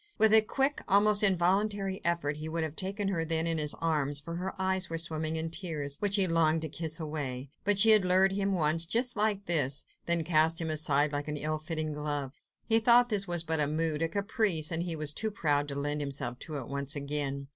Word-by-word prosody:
With 220 0 +4
a 220 - +8
quick, 270 +6 -1
almost 205 +1 +4
involuntary 195 +1 +1
effort 170 -4 -1
he 155 +1 -6
would 165 0 -2
have 155 -1 -5
taken 195 +2 -3
her 170 -4 -1
then 165 0 -1
in 165 -1 0
his 150 -1 0
arms, 145 -3 -1
for 170 +4 -7
her 190 +2 -6
eyes 190 -1 +1
were 165 - -3
swimming 160 -1 -2
in 160 0 -3
tears, 150 -6 -1
which 205 -1 +1
he 195 -2 +5
longed 165 -2 +1
to 160 - -4
kiss 160 +2 -3
away; 140 -4 -5
but 205 0 +2
she 220 +3 +6
had 215 -3 +6
lured 185 +1 +3
him 195 0 -1
once, 165 -2 +3
just 245 +6 0
like 210 -2 -1
this, 145 -5 +1 0.2
then 170 -1 +1
cast 160 0 +2
him 160 -1 -3
aside 150 -1 +1
like 145 0 -4
an 150 0 -4
ill 155 +1 -2
fitting 155 -1 -4
glove. 145 -2 -4 0.3
He 225 0 +3
thought 240 +2 +5
this 200 -3 0
was 175 -1 -1
but 160 -1 -2
a 150 - +1
mood, 155 0 -2
a 165 - 0
caprice, 200 -4 0
and 165 0 -1
he 170 -1 -3
was 150 -1 -1
too 220 +6 -1
proud 145 -8 -1
to 140 - -5
lend 145 +1 -3
himself 135 -3 -4
to 155 -2 -6
it - - -7
once 140 +1 -2
again. 140 -1 -4
165 Hz, 230 wpm, -29 LUFS, 150-195 Hz, 0.3 s, a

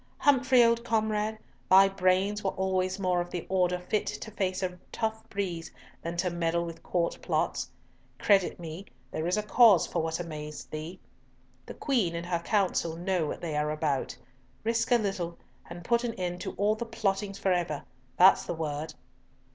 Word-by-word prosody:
"Humfrey; 260 -3 +5
old 235 0 +3
comrade, 220 -1 0 0.3
thy 195 +1 +8
brains 195 +2 +1
were 195 - +1
always 190 0 -1
more 180 -2 +1
of 175 - -5
the 175 -2 -5
order 180 -1 +2
fit 180 +4 -2
to 220 - -5
face 190 -2 -1
a 180 -1 -3
tough 220 -1 -3
breeze 180 -5 -3 0.3
than 170 +1 -4
to 180 0 0
meddle 170 0 0
with 165 -1 -8
Court 170 -1 -1
plots. - - -1 0.5
Credit 195 -4 +3
me, 170 +3 -7 0.2
there 155 +1 -2
is 180 +4 +1
cause 220 -7 +6
for - - -2
what 160 +1 -2
amazed 150 -3 -7
thee. 155 +4 -6 0.7
The - - -8
Queen 230 - 0
and 170 0 -4
her 175 -1 -1
Council 175 -3 0
know 175 -2 0
what - - -5
they 160 -3 -3
are 150 0 0
about. 150 -3 -1 0.5
Risk 230 +1 0
a - - +7
little, 190 -6 -3 0.3
and 175 +1 -9
put 235 0 +2
an 235 -2 -2
end 180 -1 -3
to - - -4
all 205 +2 +2
the 220 +2 -4
plottings 200 -3 -1
for 190 -1 +1
ever! 170 -5 -1 0.3
That's 190 +2 +7
the - - -3
word." 155 -1 -4
185 Hz, 180 wpm, -29 LUFS, 170-210 Hz, 0.7 s, thy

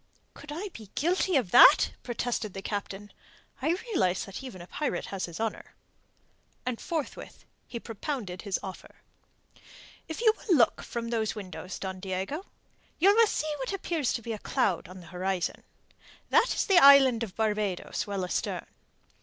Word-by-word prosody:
"Could 290 +1 -11
I 365 +7 -4
be 220 - -12
guilty 360 +3 +1
of 240 -10 +1
that?" - - +8
protested 235 -4 -3
the 195 - -6
Captain. 205 0 -5 0.5
"I 320 +6 +1
realize 185 - +1
that 195 +4 -8
even 255 -9 -8
a 175 - -9
pirate 295 +10 -3
has 195 - -2
his 170 -1 -9
honour." 225 -1 -4 0.9
And 250 -2 -3
forthwith 320 -4 -5 0.2
he 235 - -5
propounded 225 -5 -5
his 200 -3 -2
offer. 190 -1 -9 1.1
"If 320 - -6
you 445 -2 +5
will 370 - +1
look 235 - +3
from 230 -1 -5
those 225 -2 -1
windows, 185 -2 -7
Don 190 -1 -5
Diego, 190 - -4 0.5
you 390 +5 +6
will 455 +1 +5
see 310 -6 -1
what 265 +7 -3
appears 335 -8 -1
to 235 - -3
be 230 - -3
a 215 - -6
cloud 185 -3 0
on 185 +1 -11
the - - -13
horizon. 185 0 -2 0.7
That - - +4
is - - +1
the 385 -3 +6
island 270 -5 +8
of 215 -5 -4
Barbados 210 -3 -1
well 200 -2 -2
astern. 180 - -2
225 Hz, 165 wpm, -28 LUFS, 190-295 Hz, 1.1 s, that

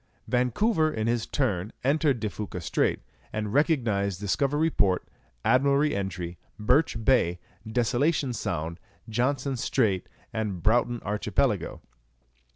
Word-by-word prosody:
Vancouver 155 - +2
in 110 -6 -2
his 115 0 0
turn 105 -7 -1
entered 140 -1 +2
De 110 - -1
Fuca 105 -3 -5
Strait, 85 - 0 0.3
and 105 -1 -3
recognized 115 - +1
Discovery 140 +10 +1
Port, 95 -7 +1 0.4
Admiralty 140 +3 +3
Entry, 90 -3 -4 0.2
Birch 115 0 +2
Bay, 105 -10 +3 0.3
Desolation 125 +4 +1
Sound, 85 -5 -3 0.3
Johnston 130 +4 0
Strait, 110 -6 0 0.2
and 105 -6 -3
Broughton 120 +1 +2
Archipelago. 105 +1 0
115 Hz, 110 wpm, -27 LUFS, 100-140 Hz, 0.4 s, Admiralty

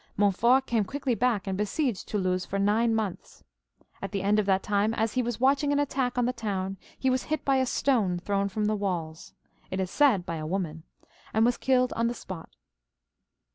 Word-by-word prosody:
Montfort 235 +7 +3
came 230 -3 +1
quickly 270 +5 -2
back 230 -4 +1
and 190 -1 -2
besieged 210 - -1
Toulouse 185 -3 0
for 195 - -4
nine 220 +3 +2
months. 210 -5 -4 0.6
At 195 - -5
the 195 -2 -2
end 210 +2 +3
of 205 - 0
that 190 -1 +2
time, 210 +2 +1
as 225 -1 0
he 255 - +1
was 240 -2 -3
watching 275 +3 +3
an 285 - +2
attack 265 -3 0
on 245 - +2
the 250 - 0
town, 195 -5 -3 0.2
he 265 - +1
was 255 0 0
hit 310 -2 -2
by 275 -1 +3
a 260 -1 +1
stone 220 -10 +1
thrown 200 +2 -1
from 210 +2 -2
the 215 +1 +1
walls 170 -6 -4 0.2
— - - -34
^it 185 - -2
is 185 -1 -2
said 255 -12 +3
by 165 -2 -3
a 155 -1 -5
woman 165 -3 -3 0.2
— - - -26
and 220 +1 +4
was 240 0 +3
killed 255 -1 +2
on 230 0 0
th^ 240 - -2
spot. 185 -6 -8
215 Hz, 215 wpm, -27 LUFS, 195-250 Hz, 0.6 s, and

